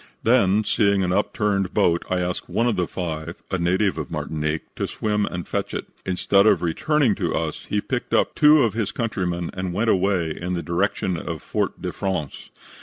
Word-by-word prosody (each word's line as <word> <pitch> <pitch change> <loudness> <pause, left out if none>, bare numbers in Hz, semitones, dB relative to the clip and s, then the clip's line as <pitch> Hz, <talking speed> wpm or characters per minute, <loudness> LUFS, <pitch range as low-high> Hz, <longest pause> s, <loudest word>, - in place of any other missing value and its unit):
Then, 110 -3 +4
seeing 100 -2 +2
an 90 0 0
upturned 100 -2 0
boat, 85 0 +3
I 90 -1 +1
asked 90 0 -3
one 115 - +1
of 120 -3 +2
the 90 -2 0
five, 85 -1 -4 0.2
a 95 - 0
native 90 +1 +1
of 75 - -5
Martinique, 75 0 -3
to - - -1
swim 105 -1 -1
and 90 -1 -5
fetch - - -3
it. - - -3 0.2
Instead 100 +2 +3
of 90 -5 +4
returning 145 - +2
to - - -2
us, - - -3
he - - -1
picked - - -3
up - - +2
two 150 -1 +6
of 115 -4 +1
his 110 -2 -1
countrymen 90 -7 -2
and 95 -1 -3
went 110 +3 +2
away 95 -4 +1
in 90 +1 -3
the 85 - -3
direction 90 0 0
of 85 -2 -5
Fort - - -2
de - - -2
France. 95 -7 -4
95 Hz, 195 wpm, -23 LUFS, 85-105 Hz, 0.2 s, two